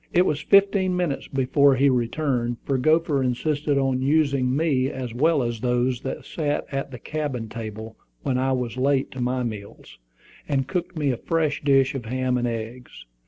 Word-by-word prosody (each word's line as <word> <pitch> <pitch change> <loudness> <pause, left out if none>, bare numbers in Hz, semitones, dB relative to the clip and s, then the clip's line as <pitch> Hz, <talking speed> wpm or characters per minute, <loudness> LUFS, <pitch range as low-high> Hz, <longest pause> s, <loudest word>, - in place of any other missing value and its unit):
It 180 +1 +4
was 150 -3 0
fifteen 195 0 +3
minutes 170 -6 -2
before 135 +1 +3
he 135 +2 +3
returned, 120 -1 0
for 135 -2 0
Gopher 155 0 +2
insisted 145 +3 0
on 135 -1 +1
using 140 -3 +2
me 140 -5 +1
as 130 -4 -5
well 150 +2 +2
as 120 -1 -3
those 125 +1 0
that 135 - -5
sat 150 -2 -2
at 135 0 -3
the 125 - -8
cabin 140 -4 -4
table 110 0 -7 0.3
when 130 -1 0
I 135 +1 +1
was 125 -1 -3
late 135 +1 +1
to 130 - -6
my 125 +1 0
meals, 100 - -8 0.5
and 135 -2 0
cooked 180 -1 -3
me 145 -3 +1
a 125 - -2
fresh 160 +1 -1
dish 135 -2 +3
of 130 -4 -5
ham 125 +1 0
and 120 - 0
eggs. 115 +2 -6
135 Hz, 180 wpm, -24 LUFS, 125-150 Hz, 0.5 s, It